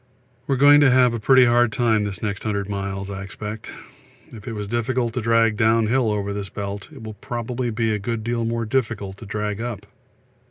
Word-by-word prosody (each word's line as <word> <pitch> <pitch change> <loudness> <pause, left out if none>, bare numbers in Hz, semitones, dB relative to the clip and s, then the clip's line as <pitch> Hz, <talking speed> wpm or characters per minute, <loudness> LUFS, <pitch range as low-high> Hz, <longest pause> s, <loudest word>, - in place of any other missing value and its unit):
We 135 - +2
are - - -3
going 145 +2 +7
to 145 - +6
have 125 -1 +4
a 115 - -2
pretty 130 +3 +6
hard 120 -1 +3
time 110 -2 +1
this 100 0 -5
next 100 -2 -3
100 100 -2 -2
miles 100 -1 -4
I 95 -1 -5
expect. 105 +3 -7 0.6
If 110 -1 -11
it 115 - -4
was 105 -1 -5
difficult 120 +1 -1
to 125 - -2
drag 115 -1 +2
downhill 115 +1 +2
over 100 -1 -2
this 100 -1 -5
belt, 100 0 -6
it 135 -7 -12
will 110 -1 -7
probably 120 +1 -4
be 115 0 0
a 105 - -1
good 115 +2 -3
deal 115 0 -1
more 115 0 -1
difficult 110 -5 -2
to 110 - -11
drag 105 +1 -3
up. 120 -4 -5
110 Hz, 210 wpm, -22 LUFS, 105-120 Hz, 0.6 s, going